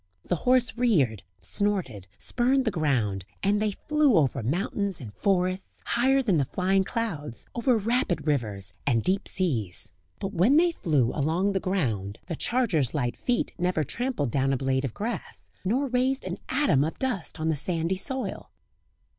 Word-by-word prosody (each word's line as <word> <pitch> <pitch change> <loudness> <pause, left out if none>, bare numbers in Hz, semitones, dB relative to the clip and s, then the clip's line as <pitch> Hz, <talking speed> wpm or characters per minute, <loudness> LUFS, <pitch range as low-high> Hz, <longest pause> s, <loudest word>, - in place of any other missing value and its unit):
The 175 - 0
horse 255 -1 +4
reared, 155 - +2 0.2
snorted, 165 - -1
spurned 260 +2 +1
the 220 - +2
ground, 125 - 0 0.2
and 205 +1 +2
they 215 - +2
flew 300 - +2
over 140 -7 +2
mountains 190 - -1
and 110 -7 -8
forests, 185 - -1
higher 265 +3 +3
than 200 -8 +2
the 140 - +2
flying 190 +5 +1
clouds, 180 - -4
over 240 0 +2
rapid 230 -2 0
rivers, 105 - -1
and 115 -5 +2
deep 190 +2 0
seas; 110 - -1 0.3
but 195 +1 -4
when 210 - +4
they 345 +1 +5
flew 145 - +1
along 165 +7 +1
the 195 - 0
ground 115 - -1
the 170 - -4
charger's 190 - +1
light 125 -5 0
feet 245 -2 -1
never 180 -3 +1
trampled 235 - -2
down 135 +1 +1
a - - +1
blade 135 +1 0
of 120 - -5
grass, 220 -1 -5
nor 240 +9 +1
raised 260 0 0
an 185 0 -4
atom 225 - +3
of 160 - -3
dust 235 -12 -2
on 160 +1 0
the 160 - +2
sandy 165 +3 0
soil. 260 +7 -3
185 Hz, 165 wpm, -27 LUFS, -, 0.3 s, they